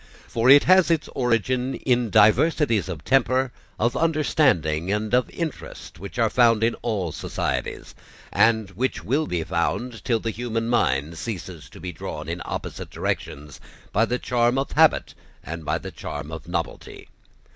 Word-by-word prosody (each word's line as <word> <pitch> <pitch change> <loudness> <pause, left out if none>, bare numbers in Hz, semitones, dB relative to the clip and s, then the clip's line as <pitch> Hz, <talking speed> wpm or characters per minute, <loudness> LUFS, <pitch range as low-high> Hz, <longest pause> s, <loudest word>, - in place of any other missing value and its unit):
For 115 +2 +1
it 140 +1 +9
has 185 -1 +5
its 165 -3 +1
origin 125 +1 0
in 125 -3 0
diversities 110 - +3
of 80 -5 -6
temper, 130 0 +2 0.3
of 120 +2 0
understanding, 130 - +1
and 105 +2 -2
of 125 -1 +3
interest, 165 - -6
which 100 +5 -9
are 115 -2 +3
found 115 -3 +4
in 115 0 +3
all 100 -8 -2
societies, - - -4 0.4
and 110 -3 +3
which 130 +6 -2
will 145 +6 0
be 85 -2 -1
found 115 +9 -2
till 115 -3 +1
the 115 - -3
human 115 0 -3
mind 80 - 0
ceases 90 -7 -6
to - - -13
be 90 +2 -5
drawn 75 - -7
in 85 +1 -4
opposite - - -6
directions 75 0 -4 0.3
by 110 +3 +3
the 125 +2 -1
charm 120 0 +1
of 135 - -1
habit 160 +1 +3 0.3
and 85 0 -7
by - - 0
the - - -8
charm 75 +1 -7
of 80 -1 -8
novelty. - - -5
115 Hz, 160 wpm, -24 LUFS, 90-130 Hz, 0.4 s, it